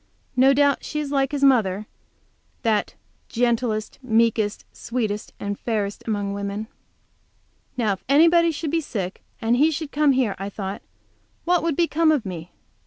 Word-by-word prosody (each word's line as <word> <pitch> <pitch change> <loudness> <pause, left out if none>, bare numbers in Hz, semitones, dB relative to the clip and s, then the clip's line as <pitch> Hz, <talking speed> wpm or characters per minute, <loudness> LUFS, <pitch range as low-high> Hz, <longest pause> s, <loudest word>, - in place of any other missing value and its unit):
No 260 +2 +6
doubt 285 0 +3
she 300 - -3
is 290 -2 -3
like 275 -1 +1
his 285 -1 -2
mother, 215 -7 +3 0.8
that 220 -3 0 0.3
"gentlest, 235 -2 0
meekest, 225 -3 +1
sweetest 215 -4 -3
and 200 0 -4
fairest 210 -3 -2
among 205 -2 -1
women!" 200 +1 -4 1.1
Now 220 -5 +2
if 190 - -9
anybody 335 +4 +5
should 310 -1 -3
be 330 0 +1
sick, 195 - -5 0.2
and 230 +2 +1
he 300 +5 +5
should 315 -1 -4
come 295 -1 +3
here, 250 -6 +1
I 195 +1 -4
thought, 195 -1 -5 0.6
what 355 0 +3
would 330 -3 0
become 330 -1 +3
of 290 -8 +1
me? 175 -3 -6
235 Hz, 155 wpm, -23 LUFS, 205-290 Hz, 1.1 s, No